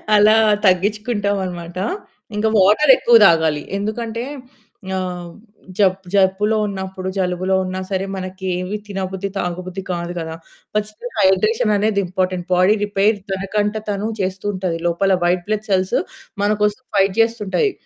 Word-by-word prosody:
అలా 210 +1 +6 0.3
తగ్గించుకుంటామన్నమాట. 195 -3 0 0.6
ఇంకా 220 +1 +2
వాటరెక్కువ 235 +5 +5
తాగాలి. 160 -3 +2
ఎందుకంటే 225 +3 -3 0.7
ఆహ్, 180 -2 -4 0.5
జబ్ 190 -2 +3 0.2
జబ్బులో 200 +2 +3
ఉన్నప్పుడు 190 -1 -5
జలుబులో 185 0 0
ఉన్నా 185 0 -4
సరే, 190 -1 -1
మనకి 190 0 -6
ఏమి 185 +3 -3
తినబుద్ది 190 0 -4
తాగబుద్ధి 185 +1 -4
కాదు 175 -1 -3
గదా! 160 -1 -4 0.4
First 210 +2 -3
హైడ్రేషననేది 210 +2 +2
important. 185 -1 -2
బాడీ 185 +3 +4
రిపేర్ 205 +1 +2 0.2
తనకంట 205 +2 -1 0.2
తను 205 +1 -1
చేస్తూ 190 +1 -3
ఉంటది. 185 -3 -2
లోపల 190 +3 +2
వైట్ 175 0 +1
బ్లడ్ 215 0 -1
సెల్స్ 185 -1 +1 0.5
మనకోసం 210 +2 +1
ఫైట్ 195 -1 +3
చేస్తుంటాయి. 225 - 0
195 Hz, 120 wpm, -19 LUFS, 185-210 Hz, 0.7 s, అలా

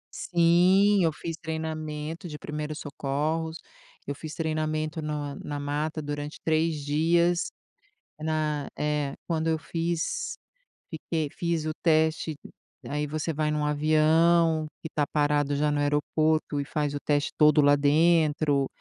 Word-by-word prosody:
Sim 180 +4 +4
eu 165 - +3
fiz 165 +1 -6
treinamento 160 +1 -5
de 150 -2 -7
primeiros 150 0 -5
socorros, 150 +4 -2 0.5
eu 145 - -3
fiz 155 +2 -8
treinamento 155 -1 -2
na 150 -2 -3
na 145 -1 -5
mata 150 +2 -2
durante 145 +1 -5
3 160 -2 +1
dias, 170 +4 +2 0.7
na 155 -2 -1
eh, 150 -2 -1
quando 165 -1 0
eu 160 -1 +1
fiz, 170 - -2 0.6
fiquei 160 -1 -2
fiz 170 -2 -2
o 155 - -1
teste, 160 -1 +2 0.5
aí 150 +1 -2
você 155 +2 -2
vai 155 +1 0
num 150 -1 0
avião 155 +2 +3
que 160 - -7
tá 145 -1 +1
parado 145 -1 +1
já 150 +1 +1
no 145 - 0
aeroporto 150 +1 +1
e - - -5
faz 150 0 -2
o 145 - -3
teste 145 0 +1
todo 150 0 +5
lá 145 0 +6
dentro 150 -1 +3
155 Hz, 135 wpm, -27 LUFS, 150-160 Hz, 0.7 s, lá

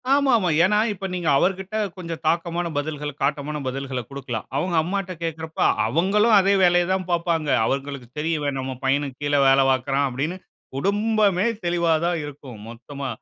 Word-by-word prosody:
ஆமா, 280 -2 +2
ஆமா. 185 -5 0
ஏன்னா 210 +3 +3 0.2
இப்ப 195 0 -7
நீங்க 175 -3 -3
அவர் 185 +5 +2
கிட்ட 190 +2 -9 0.2
கொஞ்சம் 165 -3 -6
தாக்கமான 170 +1 0
பதில்கள, 150 0 -3
காட்டமான 145 +1 -1
பதில்கள, 130 -1 -3
குடுக்கலாம். 130 -5 -5
அவுங்க 175 +3 -1
அம்மாட்ட 195 +1 -3
கேக்குறப்ப, 160 -1 -4 0.3
அவுங்களும் 210 +5 +3
அதே 195 +1 +3
வேலைய 175 0 +4
தான் 185 -1 -2
பாப்பாங்க. 170 -3 0 0.2
அவங்களுக்கு 135 -1 -3
தெரியும். 160 +1 0
"இவன் 140 -2 -2
நம்ம 130 0 -4
பையனுக்கு 135 -1 0
கீழ 145 0 +1
வேல 135 0 +5
பாக்குறான்" 135 +2 +1
அப்டின்னு 150 +9 -3 0.4
குடும்பமே 205 +1 +1 0.2
தெளிவா 170 -1 +2
தான் 175 -1 0
இருக்கும், 135 -6 -10
மொத்தமா. 135 +2 -7
160 Hz, 160 wpm, -23 LUFS, 140-185 Hz, 0.4 s, வேல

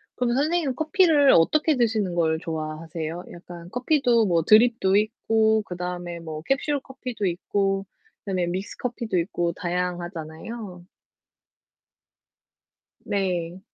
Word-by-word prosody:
그러면 245 -1 0
선생님은 300 -2 +1
커피를 315 -2 +4
어떻게 305 - +4
드시는 220 -7 0
걸 160 -2 +1
좋아하세요? 160 +1 -5
약간 175 0 -11
커피도 250 - +2
뭐 170 -3 +2
드립도 215 -1 +5
있고 220 0 +2
그다음에 180 -1 -5
뭐 160 -2 -7
캡슐 275 - 0
커피도 255 -5 -5
있고 195 +2 0 0.4
그다음에 185 -4 -1
믹스커피도 210 +4 -3
있고 170 -1 -1
다양하잖아요. 175 +2 -5 2.2
네. 180 -3 -2
195 Hz, 275 characters per minute, -24 LUFS, 175-240 Hz, 2.2 s, 드립도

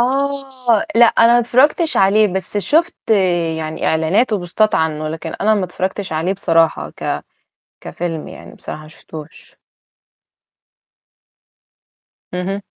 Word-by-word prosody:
آه، 265 -2 0
لأ، 235 +1 +7
أنا 230 +1 +4
ما 240 - +5
اتفرجتش 275 +7 +2
عليه 205 +3 +4
بس 190 +2 -4
شُفت 310 - 0 0.5
يعني 155 0 -4
إعلانات 165 +10 +1
و 210 - +1
بوستات 185 +5 0
عنه، 155 -1 -1
لكن 160 +1 -6
أنا 215 +2 +3
ما 200 -3 0
اتفرجتش 185 +1 -4
عليه 160 +4 0
بصراحة 165 -4 +1
ك - - -4 0.6
كفيلم 165 -3 -5
يعني - - -12
بصراحة 155 - -8
ما 155 - -13
شُفتوش. 155 -1 -13 2.8
اهم. 190 +3 -3
195 Hz, 120 wpm, -18 LUFS, 165-235 Hz, 2.8 s, لأ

